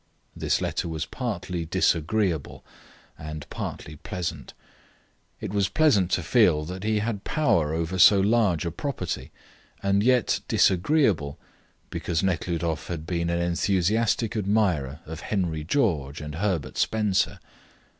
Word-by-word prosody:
This - - 0
letter - - -2
was 80 -2 -3
partly 90 - -4
disagreeable, 85 0 0 0.5
and 75 0 -7
partly 75 0 -6
pleasant. 80 -4 -5 0.8
It - - -5
was 100 -2 +1
pleasant 115 - +3
to 90 - +1
feel 85 -9 +3
that 90 +3 -6
he 110 0 +1
had 105 -1 -2
power 80 - +1
over 85 +3 -2
so 100 +2 +8
large 100 -4 +2
a 85 - -2
property, 90 - -4 0.5
and 100 0 +2
yet 125 +1 +3
disagreeable, 95 - +2 0.5
because 85 -1 -2
Nekhludoff 85 -4 -1
had 80 -3 -5
been 85 -1 -1
an 85 0 0
enthusiastic 100 +6 +1
admirer 95 -9 0
of 80 +1 -7
Henry 85 -7 -2
George 80 - 0
and 75 -1 -6
Herbert 90 -3 -2
Spencer. 105 -4 +1
90 Hz, 125 wpm, -26 LUFS, 80-105 Hz, 0.8 s, so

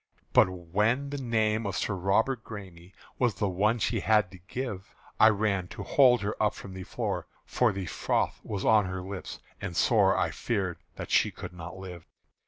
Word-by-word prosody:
But - - +6
when 105 +10 0
the 145 - -3
name 110 -3 +1
of 100 +1 -2
Sir 105 - -1
Robert 110 +6 +1
Græme 95 -5 -10 0.3
Was 120 -5 +2
the 105 - 0
one 105 +5 +2
she 110 - 0
had 105 -4 +3
to 90 - -12
give, 120 -7 -5 0.2
I 110 - +8
ran 100 -3 0
to - - -7
hold 125 -5 +5
her 105 +2 -2
up 105 -1 +2
from 95 - -9
the 95 - -7
floor; - - -3 0.2
For 125 -3 +2
the 95 -2 -4
froth - - -1
was 100 -2 -4
on 110 -2 +5
her 95 0 -4
lips, 95 0 -6 0.2
and 85 -1 -4
sore 100 -5 +4
I - - +1
feared 95 -7 -2 0.2
that - - -7
she - - +4
could - - -9
not 85 0 -8
live. 90 -3 -9
100 Hz, 190 wpm, -28 LUFS, 95-110 Hz, 0.3 s, I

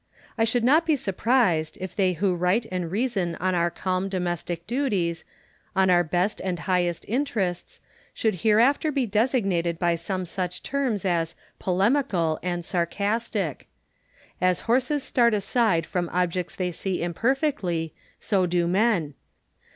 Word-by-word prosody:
I 225 - +2
should 230 +1 0
not 300 +7 +5
be 315 - +4
surprised, 195 - +1
if 185 0 -6
they 190 -3 +2
who 185 +2 +1
write 180 +6 +1
and 180 -2 -2
reason 195 -4 -1
on 185 0 -1
our 170 -1 +2
culm 185 +2 -2
domestic 175 -2 -3
duties, 200 - -1 0.5
on 190 -1 +4
our 175 0 +5
best 180 +5 -1
and 185 -2 -1
highest 175 0 0
interests, 210 -8 -2 0.3
should 215 -6 -1
hereafter 240 +8 +3
be 275 -3 0
designated 195 -7 +1
by 170 0 +2
some 185 +2 -3
such 180 0 -4
terms 260 -8 -1
as 170 -3 0 0.3
2^olemical 190 - +1
and 175 -1 -3
sarcastic. 200 - -1 0.7
As 185 -1 +2
horses 260 +4 +1
start 235 -3 +3
aside 200 -4 +1
from 175 0 -2
objects 180 0 -1
they 180 -1 -2
see 180 +1 -3
imperfectly, 180 - -1 0.3
so 190 -4 +1
do 175 0 +1
men. 185 -5 +1
185 Hz, 140 wpm, -25 LUFS, 175-230 Hz, 0.7 s, not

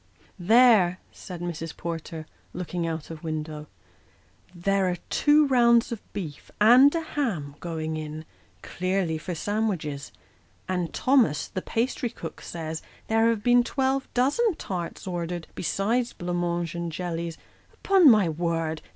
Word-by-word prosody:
" - - -33 0.2
There! 215 -8 +6
" - - -34
said 180 -2 -9
Mrs. 165 -2 -5
Porter, 165 -1 -5 0.3
looking 175 -1 -3
out 160 -1 -4
of 160 0 -9
window; 155 -1 -4 0.5
" 180 - -31
there 195 -1 +3
are 180 - -1 0.2
two 300 0 +5
rounds 235 -3 +4
of 230 - -4
beef 160 -8 -7
and 250 +8 +7
a 330 - 0
ham 225 - -3
going 160 -2 -4
in 155 0 -6 0.4
clearly 185 -3 -1
for 175 +2 -5
sandwiches; 175 -8 -2 0.6
and 180 -3 -1
Thomas, 255 - +2
the 185 - -4
pastrycook, 230 -6 -3
says, 160 -1 -5 0.3
there 225 +1 +4
have 225 -3 -1
been 245 +1 +5
twelve 265 +1 -1
dozen 305 - +2
tarts 180 - -5
ordered, 175 -2 -4
besides 230 +7 -1
blanc 175 0 -3
mange 170 -2 -1
and 170 -1 -4
jellies. 170 -1 -4 0.3
Upon 380 -6 +5
my 210 -6 +5
word 165 -1 -2
180 Hz, 140 wpm, -26 LUFS, 165-235 Hz, 0.6 s, and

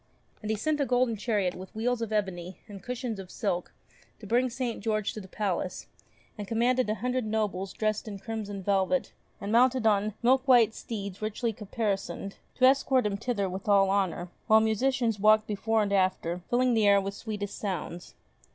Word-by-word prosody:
And 215 - -5
he 220 - 0
sent 295 +7 0
a - - +2
golden 245 -2 +2
chariot 205 -4 0
with 185 +2 -10
wheels 235 +2 0
of 225 -2 -3
ebony 190 -4 -2
and 200 -3 -10
cushions 245 -1 -4
of 190 -2 -8
silk 185 -5 -2 0.5
to 215 - -11
bring 245 +5 +2
St. 245 -1 -3
George 215 -1 -1
to 215 - -6
the 190 - -11
palace, 185 -2 -3 0.5
and 205 - -5
commanded 240 +2 +1
a 215 - +1
hundred 250 +2 -1
nobles 210 -3 -2
dressed 215 +1 -2
in 205 -2 -5
crimson 205 -2 -5
velvet, 200 +7 +1 0.3
and 200 - -4
mounted 250 +1 +4
on 210 -1 +2
milk 260 +2 +3
white 235 -4 +6
steeds 200 -5 -6
richly 220 +2 -2
caparisoned, 200 -2 -3 0.2
to 255 - +4
escort 265 -1 +4
him 205 -1 0
thither 205 -2 -1
with 190 +2 -6
all 195 -1 +4
honour, 185 -3 0 0.2
while 220 0 +7
musicians 225 0 +1
walked 215 +1 +5
before 220 +1 0
and 200 -1 -2
after, 185 -2 +1
filling 250 0 +3
the 220 -2 +3
air 200 0 +6
with 195 0 -4
sweetest 205 -1 -5
sounds. 180 -3 -5
215 Hz, 185 wpm, -28 LUFS, 195-235 Hz, 0.5 s, while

